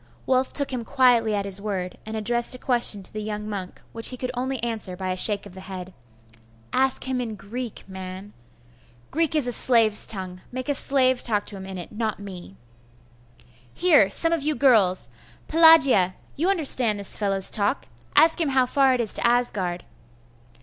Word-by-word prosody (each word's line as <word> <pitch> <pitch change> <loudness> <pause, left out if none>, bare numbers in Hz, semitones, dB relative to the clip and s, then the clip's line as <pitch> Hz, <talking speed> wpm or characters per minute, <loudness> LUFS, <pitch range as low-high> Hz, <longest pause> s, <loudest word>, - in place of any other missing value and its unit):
Wulf 260 0 0
took 280 -2 -1
him 245 -2 -4
quietly 240 -4 +2
at 200 -1 -2
his 200 0 -4
word, 190 -4 -5
and 220 0 -5
addressed 235 +3 +3
a - - -8
question 240 -6 +1
to - - -9
the 215 - -5
young 210 0 -6
monk, 195 -4 -7
which 230 0 +1
he 255 - -6
could 250 0 -4
only 260 +2 -3
answer 220 -6 -3
by 185 0 -4
a - - -2
shake 200 +2 +3
of 200 - -13
the 190 - -11
head. 185 -1 -9 0.8
'Ask 265 0 +1
him 260 -1 -2
in 225 -3 -5
Greek, 230 +3 -8
man.' 190 +1 -9 0.8
'Greek 320 0 -1
is 300 -4 0
a 245 - -2
slave's 225 -4 +2
tongue. 185 -3 -3
Make 255 +2 -6
a - - +2
slave 260 -2 +2
talk 210 -3 -1
to 205 - -4
him 190 -1 -9
in 190 -1 -7
it, 175 - -9
not 220 -1 -3
me.' 185 - -11 1.2
'Here 300 - +4
some 330 +11 +4
of 330 - -1
you 300 +1 -1
girls! 220 -9 +2 0.4
Pelagia! 285 - +5 0.2
you 335 +6 -1
understand 260 - +3
this 200 -1 0
fellow's 195 -2 0
talk. 210 +5 0 0.3
Ask 320 +3 +5
him 310 - 0
how 265 -1 +2
far 265 0 +2
it 245 - -1
is 220 - 0
to - - 0
Asgard. 210 -8 -1
225 Hz, 190 wpm, -23 LUFS, 195-260 Hz, 1.2 s, Pelagia